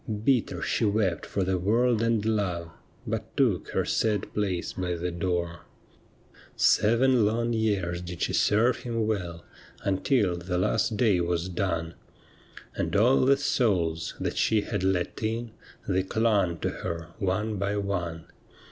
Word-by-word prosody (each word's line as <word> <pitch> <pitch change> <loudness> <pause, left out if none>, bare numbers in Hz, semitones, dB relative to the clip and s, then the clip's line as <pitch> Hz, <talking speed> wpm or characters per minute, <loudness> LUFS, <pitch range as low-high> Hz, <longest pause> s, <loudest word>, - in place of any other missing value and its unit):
Bitter 130 -4 +1
she - - 0
wept 100 -4 +1
for 100 - -1
the 95 0 0
world 115 +4 +2
and 115 -2 +1
love. 90 -6 -1 0.3
But - - -4
took - - +2
her - - 0
sad 105 -3 0
place 95 -4 -2
by 90 -2 -2
the 90 +1 -3
door. 85 -1 -3 0.9
Seven 115 +3 +4
long 115 +3 +1
years 100 -6 0
did 90 -1 -5
she - - -1
serve 115 +4 +3
him 115 -2 -2
well, 90 -6 -3 0.4
Until 100 -1 +1
the 90 +1 -3
last 105 +4 +1
day 105 -7 +3
was 85 +1 -1
done; 85 -2 -2 0.8
And - - -2
all 120 +6 +4
the 140 +1 +5
souls 90 - 0
that - - -3
she 110 -2 +3
had 95 - -3
let 95 -2 0
in, 115 +1 -2 0.4
They 95 0 +2
clung 100 -3 +1
to - - 0
her 85 0 -4
one 105 +2 -1
by 100 +1 -1
one. 85 -5 -3
100 Hz, 145 wpm, -27 LUFS, 90-110 Hz, 0.9 s, the